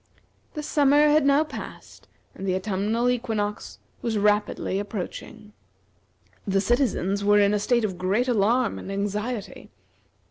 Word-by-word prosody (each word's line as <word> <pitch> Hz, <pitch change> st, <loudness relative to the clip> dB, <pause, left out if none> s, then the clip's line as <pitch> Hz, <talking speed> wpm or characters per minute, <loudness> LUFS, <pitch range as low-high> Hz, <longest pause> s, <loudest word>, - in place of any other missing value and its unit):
The 300 Hz, -, -4 dB
summer 295 Hz, 0 st, +4 dB
had 295 Hz, -1 st, +3 dB
now 280 Hz, +2 st, +4 dB
passed, 310 Hz, -, -10 dB, 0.3 s
and 195 Hz, -, -7 dB
the 185 Hz, -, +1 dB
autumnal 205 Hz, +5 st, -1 dB
equinox 220 Hz, -4 st, -2 dB, 0.2 s
was 225 Hz, -2 st, -1 dB
rapidly 205 Hz, -2 st, +1 dB
approaching. 205 Hz, +1 st, -7 dB, 0.9 s
The 195 Hz, 0 st, +2 dB
citizens 200 Hz, -3 st, 0 dB
were 205 Hz, +1 st, +4 dB
in 205 Hz, 0 st, +4 dB
a 210 Hz, -, +1 dB
state 235 Hz, +2 st, +1 dB
of 185 Hz, -4 st, -5 dB
great 200 Hz, +7 st, 0 dB
alarm 235 Hz, +1 st, +1 dB
and 195 Hz, -, -7 dB
anxiety. 205 Hz, +3 st, -4 dB
210 Hz, 135 wpm, -25 LUFS, 200-245 Hz, 0.9 s, summer